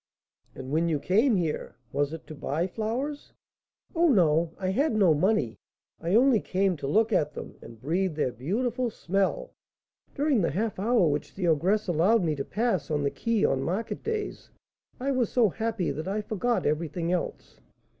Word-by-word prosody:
"And 130 0 -7
when 165 +3 +2
you 155 - +1
came 220 - +3
here, 165 -5 -2 0.2
was 145 0 0
it 160 -1 -8
to - - -9
buy 155 +3 -2
flowers?" 235 +9 -4 0.6
"Oh, 340 +1 +4
no, 165 - +3
I 185 -1 -2
had 260 +6 +1
no 190 -6 +5
money; 150 - +1 0.4
I 170 +4 0
only 250 -1 +5
came 190 -1 0
to 140 - -5
look 220 +8 +2
at 150 -4 +1
them, - - -7
and 115 -1 -12
breathe 170 - -1
their 150 -4 0
beautiful 235 - -1
smell. 205 - -1 0.6
During 285 -5 +2
the 170 - +1
half 210 +4 -2
hour 215 -3 +3
which 150 0 -2
the 185 -2 -1
ogress 185 +7 +2
allowed 185 +6 +3
me 155 -3 0
to 140 - -3
pass 215 - -1
on 150 -2 0
the 140 - +1
quay 230 -3 0
on 135 - +1
market 190 +10 -3
days, 435 -2 -4 0.5
I 270 +2 -1
was 255 -5 0
so 235 -4 +4
happy 220 -3 -2
that 155 +3 -5
I 205 +2 -1
forgot 220 +3 -1
everything 165 +3 -1
else." 180 -1 -4
190 Hz, 180 wpm, -27 LUFS, 160-230 Hz, 0.6 s, no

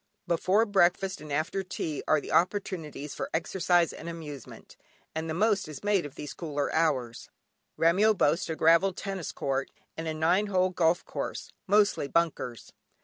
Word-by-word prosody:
Before 185 +6 +2
breakfast 190 -2 +2
and 150 -1 -9
after 155 +6 -1
tea 165 -5 -4
are 155 - +4
the - - -8
opportunities 170 -6 -1
for - - -4
exercise 175 0 +2
and 170 - -7
amusement, 150 -6 -9 0.4
and 160 +1 -3
the 160 - -2
most 205 0 +2
is 155 +2 -9
made 205 -6 +1
of 145 - -16
these 150 - -7
cooler 145 -4 -3
hours. 130 -8 0 0.5
Remyo 195 +7 +4
boasts 165 +5 +2
a 160 - -1
gravel 165 +5 +4
tennis 190 -3 -5
court, 135 0 -2 0.3
and 165 0 -5
a 160 - -1
nine 175 +6 +2
hole 185 -2 +2
golf 175 -1 +1
course, - - -5
mostly 200 -6 +3
bunkers. 140 -8 -1
170 Hz, 160 wpm, -28 LUFS, 155-190 Hz, 0.5 s, are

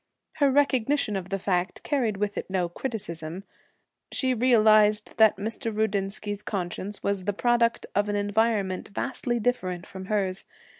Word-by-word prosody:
Her 285 -2 +4
recognition 275 -4 +2
of 190 -1 -4
the 195 - -1
fact 185 -1 -1
carried 240 -8 0
with 205 0 -1
it - - -5
no 185 -2 0
criticism. 170 -5 -5 0.7
She 260 -1 +1
realized 215 -3 +4
that 220 -3 +6
Mr. 225 +3 -3
Rudinsky's 205 -1 -2
conscience 195 0 -4
was 200 -2 -1
the 205 - 0
product 235 +2 +2
of 205 +1 +1
an 205 - 0
environment 205 -2 0
vastly 240 +2 -2
different 185 -7 -1
from 190 0 -9
hers. 195 -2 -1
210 Hz, 145 wpm, -26 LUFS, 195-230 Hz, 0.7 s, that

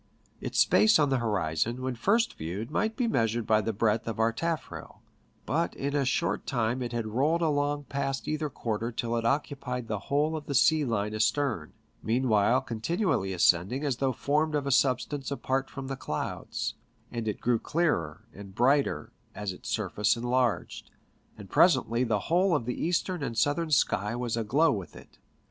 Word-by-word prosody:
Its - - -5
space 215 +1 +5
on 150 -2 +3
the 135 -2 +1
horizon 105 +2 -1
when 130 0 -1
first 205 - +1
viewed 95 +9 -5
might 220 +1 0
be 250 -3 +1
measured 115 - 0
by 110 0 +3
the 115 - -1
breadth 110 +1 0
of 115 - -3
our 115 0 +2
taffrail; 165 +5 -5 0.4
but 165 +4 -1
in 140 +1 -3
a 140 -2 +2
short 165 +6 -1
time 120 0 0
it 120 - -3
had 120 -2 -2
rolled 145 +10 +1
along 145 -1 0
past 135 -1 -3
either 155 0 -1
quarter 115 -2 -3
till 115 0 -2
it 115 -1 -1
occu 140 +3 0
pied 125 -3 -4
the 105 -2 -2
whole 150 +3 +1
of 150 -2 -6
the 140 - -2
sea 155 +3 +4
line 105 -4 -1
astern, 110 - 0 0.3
meanwhile 115 0 +2
con 115 -4 -6
tinually 155 - 0
ascending 90 - +2
as 140 -5 0
though 135 0 +1
formed 150 +4 0
of 145 -1 -1
a 140 - -1
substance 135 +2 +1
apart 135 -1 -1
from 135 -1 -7
the 135 0 -4
clouds; 75 - -4 0.4
and 115 -2 -4
it 105 - -2
grew 120 -1 +1
clearer 145 - -1
and 100 -1 -11
brighter 135 +5 +2 0.2
as 105 -3 -4
its - - -9
surface 105 +2 0
enlarged, 120 -1 -1 0.5
and - - -10
presently 115 +2 +4
the 110 -5 0
whole 180 +1 +2
of 125 -6 -1
the 125 - -3
eastern 175 +1 0
and 115 -4 -4
southern 145 +7 +1
sky 105 -6 +1
was 120 -2 -2
aglow 125 +9 +2
with 95 -6 -5
it. - - -15
125 Hz, 185 wpm, -28 LUFS, 110-145 Hz, 0.5 s, space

